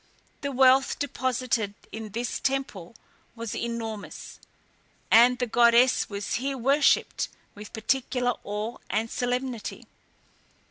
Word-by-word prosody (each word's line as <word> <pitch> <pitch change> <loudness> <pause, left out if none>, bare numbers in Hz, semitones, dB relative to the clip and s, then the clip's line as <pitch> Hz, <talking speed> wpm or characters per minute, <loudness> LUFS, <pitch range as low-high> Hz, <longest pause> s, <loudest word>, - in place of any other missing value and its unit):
The 280 - -2
wealth 265 +1 +4
deposited 250 -6 -1 0.2
in 220 -1 -6
this 235 +4 -3
temple 265 -9 -3 0.4
was 230 -2 -5
enormous, 225 -3 -5 0.7
and 245 +2 +7
the 245 - 0
goddess 235 +2 +4
was 200 -1 -4
here 275 0 -2
worshipped 275 +4 +2 0.2
with 210 0 -11
particular 245 +2 0
awe 210 +3 -4
and 220 +3 -1
solemnity. 245 -2 -3
240 Hz, 105 wpm, -26 LUFS, 220-260 Hz, 0.7 s, and